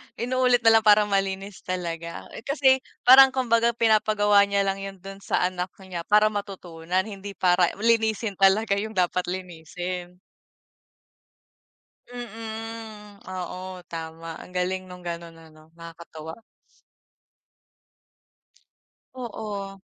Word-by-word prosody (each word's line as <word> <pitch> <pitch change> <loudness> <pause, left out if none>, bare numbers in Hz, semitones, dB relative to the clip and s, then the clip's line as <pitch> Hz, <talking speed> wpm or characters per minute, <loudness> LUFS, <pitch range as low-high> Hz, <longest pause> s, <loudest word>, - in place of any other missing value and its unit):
inuulit 250 0 +1
na 225 - +7
lang - - -12
para 210 0 +7
malinis 195 -1 -2
talaga, 170 -2 -5
eh, - - -8
kasi 270 -2 +4 0.2
parang 265 +1 +9
kumbaga 235 -2 +2
pinapagawa 215 -2 +3
niya 200 0 +1
lang 195 0 -1
yun 195 0 -7
dun 195 0 -9
sa - - 0
anak 180 0 -1 0.2
niya 175 -3 -7
para 210 +1 +4
matutunan 185 -3 -3
hindi 200 -1 -8
para 180 -1 +3
linisin 220 -1 +1
talaga 200 +1 +3
yung 220 +1 -5
dapat 180 0 0
linisin. 180 0 -6 1.9
Mm, 225 -3 -8
oo, 185 0 -6
tama 165 0 -7
ang - - -12
galing 185 +1 -1
nung 180 -1 -11
ganun 170 -1 -6
ano 155 -1 -17
nakakatuwa. 165 0 -10 2.8
Oo. 210 -5 -6
195 Hz, 110 wpm, -25 LUFS, 180-220 Hz, 2.8 s, parang